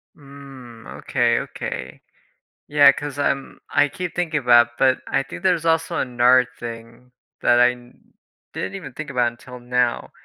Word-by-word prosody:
Mm, 135 Hz, -5 st, -13 dB
okay, -, -, +1 dB
okay, -, -, -7 dB, 0.7 s
yeah, 145 Hz, -1 st, +6 dB
'cause 145 Hz, 0 st, -7 dB
I'm 140 Hz, -1 st, -2 dB
I 145 Hz, 0 st, +3 dB
keep 180 Hz, +2 st, -6 dB
thinking 165 Hz, -4 st, -1 dB
about, 120 Hz, -1 st, +4 dB
but 130 Hz, 0 st, +3 dB
I 135 Hz, -, 0 dB
think 135 Hz, -, -10 dB
there's 175 Hz, -4 st, +1 dB
also 165 Hz, 0 st, +1 dB
another 125 Hz, 0 st, +3 dB
thing 115 Hz, +1 st, -10 dB, 0.3 s
that 120 Hz, -, +4 dB
I 125 Hz, 0 st, +5 dB
n 125 Hz, 0 st, -17 dB, 0.4 s
didn't -, -, -5 dB
even 155 Hz, -10 st, -8 dB
think 155 Hz, +3 st, -7 dB
about 120 Hz, -3 st, +1 dB
until 125 Hz, +1 st, -13 dB
now, 125 Hz, 0 st, -1 dB
130 Hz, 150 wpm, -21 LUFS, 120-145 Hz, 0.7 s, yeah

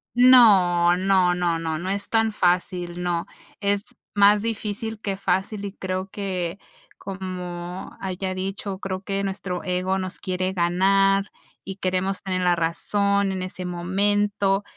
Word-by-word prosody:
No, 195 Hz, -9 st, +6 dB
no, 185 Hz, -1 st, +3 dB
no, 175 Hz, -2 st, 0 dB
no, 160 Hz, -1 st, -3 dB
no 185 Hz, +2 st, -4 dB
es 200 Hz, +1 st, -2 dB
tan 225 Hz, -1 st, +2 dB
fácil, 180 Hz, -2 st, 0 dB
no. 175 Hz, -1 st, -1 dB, 0.4 s
Es 200 Hz, 0 st, -1 dB, 0.2 s
más 205 Hz, +1 st, +5 dB
difícil 220 Hz, 0 st, -3 dB
que 195 Hz, -2 st, -2 dB
fácil, 200 Hz, +1 st, -1 dB
y 200 Hz, -, -6 dB
creo 185 Hz, 0 st, -4 dB
que, 185 Hz, -2 st, -3 dB, 0.4 s
como 180 Hz, -1 st, -6 dB
haya 185 Hz, 0 st, -3 dB
dicho, 195 Hz, +1 st, -4 dB
creo 190 Hz, -1 st, -4 dB
que 195 Hz, 0 st, -2 dB
nuestro 190 Hz, -2 st, -4 dB
ego 185 Hz, +1 st, 0 dB
nos 185 Hz, -1 st, -5 dB
quiere 185 Hz, 0 st, -2 dB
ganar 195 Hz, +3 st, +2 dB, 0.3 s
y 195 Hz, 0 st, -7 dB
queremos 190 Hz, +1 st, -1 dB
tener 185 Hz, -1 st, -2 dB
la 180 Hz, -1 st, +3 dB
razón 200 Hz, +4 st, +1 dB
en 190 Hz, -, -3 dB
ese 185 Hz, 0 st, -5 dB
momento, 200 Hz, +2 st, 0 dB
190 Hz, 140 wpm, -24 LUFS, 180-200 Hz, 0.4 s, No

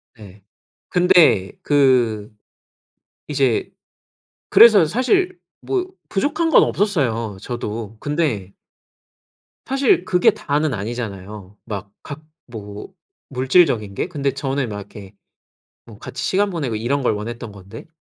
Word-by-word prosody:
네. 100 Hz, -3 st, -15 dB, 0.5 s
근데 175 Hz, -, +4 dB
그 125 Hz, -7 st, +2 dB, 1.0 s
이제 135 Hz, -5 st, 0 dB, 0.8 s
그래서 215 Hz, -7 st, +7 dB
사실 360 Hz, -, 0 dB, 0.2 s
뭐 375 Hz, -2 st, -1 dB, 0.2 s
부족한 295 Hz, +10 st, 0 dB
건 -, -, +6 dB
없었어요 120 Hz, -, -1 dB
저도. 115 Hz, -2 st, -5 dB
근데 145 Hz, -, -2 dB, 1.1 s
사실 270 Hz, -8 st, +2 dB
그게 180 Hz, -1 st, +4 dB
다는 145 Hz, 0 st, -1 dB
아니잖아요. 105 Hz, -3 st, -6 dB
막 100 Hz, -2 st, -6 dB
각 145 Hz, +1 st, -8 dB, 0.3 s
뭐 105 Hz, -3 st, -8 dB, 0.4 s
물질적인 130 Hz, -, +2 dB
게? 100 Hz, -, -2 dB
근데 140 Hz, -6 st, -2 dB
저는 135 Hz, -2 st, -2 dB
막 105 Hz, -, -5 dB
이렇게 100 Hz, -1 st, -11 dB, 0.7 s
뭐 110 Hz, -3 st, -14 dB
같이 130 Hz, -, -7 dB
시간 200 Hz, +9 st, +1 dB
보내고 140 Hz, -, -3 dB
이런 130 Hz, +6 st, -1 dB
걸 125 Hz, -, +2 dB
원했던 115 Hz, +2 st, -6 dB
건데? 100 Hz, -, -12 dB
125 Hz, 225 characters per minute, -20 LUFS, 105-165 Hz, 1.1 s, 그래서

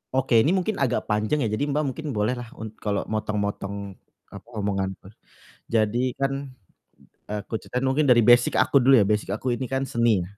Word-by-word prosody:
Oke, 125 Hz, -3 st, +3 dB
ini 160 Hz, +11 st, +3 dB
mungkin 195 Hz, +3 st, -1 dB
agak 130 Hz, -3 st, 0 dB
panjang 110 Hz, +7 st, +1 dB
ya. 110 Hz, -, 0 dB
Jadi, 125 Hz, +7 st, -1 dB
Mbak, 150 Hz, +1 st, 0 dB
mungkin 155 Hz, +3 st, -7 dB
bolehlah 120 Hz, +3 st, -1 dB
un 110 Hz, -1 st, -7 dB
kalau 100 Hz, -2 st, -1 dB
motong-motong, 100 Hz, -2 st, -3 dB, 0.4 s
apa, 100 Hz, +3 st, -11 dB
omonganku. 95 Hz, -2 st, -3 dB, 0.6 s
Jadi 115 Hz, +3 st, +1 dB
kan 135 Hz, 0 st, +1 dB, 1.0 s
aku 105 Hz, +2 st, -5 dB
ceritain 125 Hz, +1 st, -4 dB
mungkin 135 Hz, +3 st, +2 dB
dari 120 Hz, -2 st, +6 dB
basic 120 Hz, +2 st, +5 dB
aku 140 Hz, -, +4 dB
dulu 135 Hz, +1 st, +6 dB
ya. -, -, +5 dB
Basic 105 Hz, -2 st, 0 dB
aku 125 Hz, +3 st, -2 dB
ini 130 Hz, -, -4 dB
kan 135 Hz, +1 st, -1 dB
seni, 115 Hz, -7 st, +1 dB
115 Hz, 175 wpm, -24 LUFS, 105-130 Hz, 1.0 s, dari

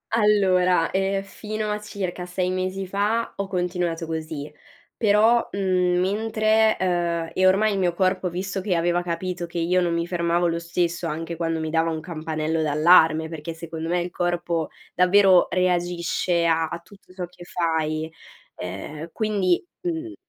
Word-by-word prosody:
allora, 185 Hz, -5 st, +3 dB
eh, 195 Hz, +1 st, 0 dB
fino 215 Hz, +1 st, -4 dB
a 210 Hz, -, -2 dB
circa 185 Hz, -4 st, -5 dB
6 180 Hz, 0 st, -2 dB
mesi 185 Hz, +1 st, -2 dB
fa 210 Hz, +4 st, 0 dB
ho 200 Hz, -, -2 dB
continuato 175 Hz, -2 st, -2 dB
così, 155 Hz, -2 st, -5 dB, 0.5 s
però, 220 Hz, +2 st, +4 dB
mhmm, 180 Hz, -2 st, +1 dB
mentre 215 Hz, +2 st, +2 dB
uhm, 170 Hz, -2 st, 0 dB
e 185 Hz, 0 st, +3 dB
ormai 210 Hz, +3 st, +4 dB
il 195 Hz, -, -1 dB
mio 175 Hz, -2 st, +1 dB
corpo 185 Hz, 0 st, +1 dB
visto 190 Hz, +2 st, -3 dB
che 185 Hz, -2 st, 0 dB
aveva 175 Hz, +1 st, +1 dB
capito 175 Hz, 0 st, -3 dB
che 170 Hz, 0 st, -5 dB
io 180 Hz, +2 st, +2 dB
non 170 Hz, -1 st, 0 dB
mi 170 Hz, 0 st, 0 dB
fermavo 175 Hz, 0 st, +1 dB
lo 170 Hz, 0 st, -1 dB
stesso 170 Hz, 0 st, -1 dB
anche 165 Hz, +2 st, -4 dB
quando 165 Hz, -1 st, -1 dB
mi 160 Hz, -, -3 dB
dava 165 Hz, +1 st, +1 dB
un 160 Hz, -1 st, -3 dB
campanello 160 Hz, -1 st, -2 dB
d'allarme, 160 Hz, +1 st, +4 dB
perché 160 Hz, 0 st, -6 dB
secondo 165 Hz, 0 st, -6 dB
me 175 Hz, 0 st, +1 dB
il 175 Hz, -, -4 dB
corpo 175 Hz, -2 st, -1 dB, 0.3 s
davvero 185 Hz, 0 st, +5 dB
reagisce 175 Hz, -1 st, 0 dB
a 165 Hz, -1 st, +2 dB
a 170 Hz, +2 st, -6 dB
tutto 190 Hz, +1 st, -19 dB
ciò 180 Hz, -1 st, -4 dB
che 175 Hz, 0 st, -14 dB
fai, 160 Hz, -2 st, -1 dB, 0.4 s
uhm, 150 Hz, -, -7 dB
quindi 205 Hz, -, 0 dB, 0.2 s
mhmm 330 Hz, -1 st, -3 dB
175 Hz, 160 wpm, -24 LUFS, 165-190 Hz, 0.5 s, davvero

